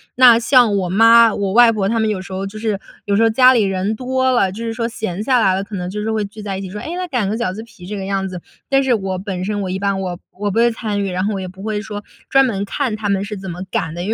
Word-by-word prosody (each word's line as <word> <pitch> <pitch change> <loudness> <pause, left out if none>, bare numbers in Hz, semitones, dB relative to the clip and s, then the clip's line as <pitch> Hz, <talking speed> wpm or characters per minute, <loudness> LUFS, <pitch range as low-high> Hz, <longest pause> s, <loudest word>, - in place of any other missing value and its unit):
那， 245 -2 +7
像 235 -3 +4
我 185 -2 -1
妈、 230 +3 +6
我 200 -2 -1
外 240 +3 +7
婆 200 -3 0
她 230 +1 0
们 220 - +1
有 200 -3 -2
时 190 0 -11
候 190 +1 -3
就 210 +2 -9
是 215 -2 -2 0.3
有 205 - -1
时 - - +3
候 225 - +5
家 255 +3 +6
里 235 -4 +3
人 195 +2 -1
多 260 +1 0
了， 220 -6 +2
就 225 +4 -6
是 230 -1 -3
说 230 0 -2
闲 220 -5 -4
下 250 +3 +2
来 190 -3 +3
了， 190 - -1
可 205 - -8
能 180 -1 -4
就 210 +3 -5
是 220 - -2
会 215 -1 0
聚 205 +2 -8
在 200 -2 -4
一 195 - -5
起， 190 - -6
说” 210 +3 -7
诶， 330 +9 -5
那 365 0 -3
擀 245 -8 0
个 205 - -1
饺 185 -6 -2
子 215 - -7
皮 220 -5 -17
“这 205 +3 -5
个 190 - -5
样 195 0 -1
子。 180 -1 -7 0.3
但 275 0 +3
是 260 -2 +2
我 190 -3 -2
本 185 -2 -4
身 205 +1 -2
我 190 - -3
一 185 - -2
般 195 0 -1
我 180 -2 -4 0.2
我 205 0 -1
不 195 - -4
会 235 +1 +4
参 215 -3 -3
与， 195 - -2
然 185 +1 -1
后 210 - -1
我 195 - -3
也 185 - -5
不 190 +1 -13
会 210 -1 -2
说 210 -1 -6 0.3
专 270 0 +5
门 200 -6 -2
看 235 +3 -2
她 210 -1 -3
们 200 0 0
是 210 +1 -6
怎 190 -2 -7
么 180 +2 -7
擀 165 -3 -2
的， 175 - -5
因 195 - -4
205 Hz, 350 characters per minute, -18 LUFS, 195-230 Hz, 0.3 s, 那